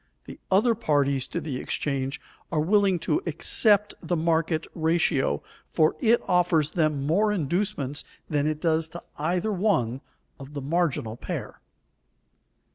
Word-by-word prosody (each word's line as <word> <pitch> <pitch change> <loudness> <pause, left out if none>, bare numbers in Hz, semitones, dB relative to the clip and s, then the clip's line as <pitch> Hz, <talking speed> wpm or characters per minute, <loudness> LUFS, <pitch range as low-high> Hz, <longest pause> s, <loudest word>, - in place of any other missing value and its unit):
The - - -10
other 215 +5 +4
parties 140 - +1
to 170 - -3
the 150 -5 -4
exchange 135 +1 -2 0.3
are 160 - +1
willing 195 +3 +3
to 330 - 0
accept 210 -2 +3
the 175 +1 -1
market 160 -1 0
ratio, 160 - +1 0.2
for 155 -1 +2
it 235 0 +3
offers 175 -5 +2
them 155 -5 0
more 205 +8 +2
inducements 170 -5 -1 0.2
than 145 0 0
it 155 -1 -1
does 160 0 +1
to 175 - -9 0.2
either 175 +7 0
one 160 - 0 0.4
of 140 +2 -11
the 140 - -3
marginal 140 -8 -1
pair. - - -6
160 Hz, 135 wpm, -26 LUFS, 145-185 Hz, 0.4 s, other